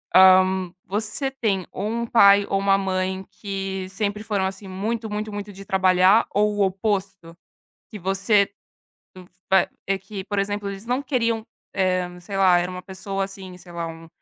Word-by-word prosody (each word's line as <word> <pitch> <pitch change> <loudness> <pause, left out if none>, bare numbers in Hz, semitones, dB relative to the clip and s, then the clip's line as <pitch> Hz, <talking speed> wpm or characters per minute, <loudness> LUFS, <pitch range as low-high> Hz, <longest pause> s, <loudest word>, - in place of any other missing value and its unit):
ah, 185 0 +9 0.4
você 215 +7 -2
tem 215 -8 -1
ou 195 - -4
um 235 +1 -2
pai 200 -3 +6
ou 195 - +1
uma 195 0 +3
mãe 190 0 -2
que 195 -2 -5
sempre 205 +2 -2
foram, 205 -3 -1
assim, 190 +1 -5
muito, 220 +4 -3
muito, 210 +1 -4
muito 205 0 -6
de 195 0 -11
trabalhar 190 +3 +4
ou 210 0 +2
o 205 - 0
oposto? 190 -3 -2 0.6
Que 210 - -8
você, 195 +2 +2 1.0
va 190 -2 +4 0.2
é 195 0 0
que 195 0 -8
por 205 -1 -3
exemplo, 205 0 -1
eles 200 +3 -8
não 250 +3 0
queriam 230 -5 -1 0.3
eh, 185 -2 +1
sei 195 +3 -6
lá, 185 -2 +5
era 175 +1 -1
uma 180 0 -7
pessoa 195 +1 -4
assim, 190 -2 -9
sei 180 - -15
lá, 170 -1 -4
um 165 0 -9
195 Hz, 175 wpm, -23 LUFS, 190-210 Hz, 1.0 s, ah